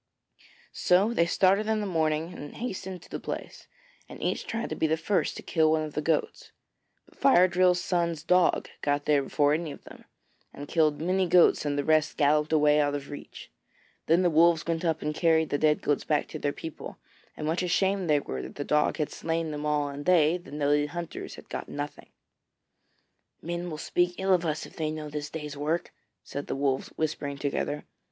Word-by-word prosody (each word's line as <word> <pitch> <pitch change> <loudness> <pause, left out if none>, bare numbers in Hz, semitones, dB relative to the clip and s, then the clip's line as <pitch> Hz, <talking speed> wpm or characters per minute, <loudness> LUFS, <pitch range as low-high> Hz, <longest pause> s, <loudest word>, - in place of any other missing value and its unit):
So 195 +6 +3
they 170 -6 +2
started 195 +4 +3
in 220 0 +1
the 210 - -2
morning 160 -2 0
and 145 - -9
hastened 190 -6 -5
to - - -17
the - - -4
place, - - -7 0.4
and - - -10
each - - -2
tried 225 0 -3
to - - -1
be 160 - +1
the 160 +1 +1
first 190 +5 0
to - - -8
kill 160 -2 +2
one 155 0 +2
of 155 -1 -6
the 150 - -1
goats. 155 0 -1 0.5
But - - -24
Fire 185 -10 +6
drill's 180 0 +3
son's 170 -3 -1
dog 180 +1 +3
got 145 0 0
there 145 -2 +3
before 145 +1 +2
any 160 0 -2
of - - -11
them, - - -14 0.5
and 145 - -8
killed 155 -2 +2
many 185 +3 +1
goats 175 -2 +5
and 145 -1 -1
the 145 - 0
rest 155 0 +2
galloped 150 +1 +2
away 150 -1 +4
out 145 -1 +1
of 140 0 -6
reach. 145 - -10 0.6
Then 170 +3 +4
the 175 - +3
Wolves 165 +1 +4
went 165 0 -2
up 160 -2 0
and 150 0 -1
carried 160 -1 +2
the 145 - 0
dead 150 -1 +2
goats 145 - +1
back 150 - 0
to 155 - -6
their 145 - 0
people, 160 +1 -8 0.4
and 150 - -4
much 160 +4 0
ashamed 190 0 +1
they 145 -1 +4
were 65 - -5
that - - -9
the 145 - -3
dog 150 +1 +1
had 150 -3 -2
slain 165 -1 -2
them 150 0 -4
all 150 -1 +1
and 145 +1 -7
they, 165 -3 +5
the 175 - -15
noted 145 0 +1
hunters, 170 +1 -6
had - - -13
got - - -6
nothing. 145 0 -6 1.3
'Men 175 +1 -4
will 155 - -5
speak 175 +3 0
ill 190 0 +2
of 175 -2 +1
us 155 0 -2
if - - -14
they 155 -2 -1
know 155 0 -5
of 150 - -8
this 145 0 -4
day's 150 -2 -6
work,' 155 +4 -2 0.3
said 140 - -6
the - - -2
Wolves, 135 -1 0
whispering 150 -2 -3
together. 145 +1 -2
155 Hz, 210 wpm, -27 LUFS, 150-175 Hz, 1.3 s, Fire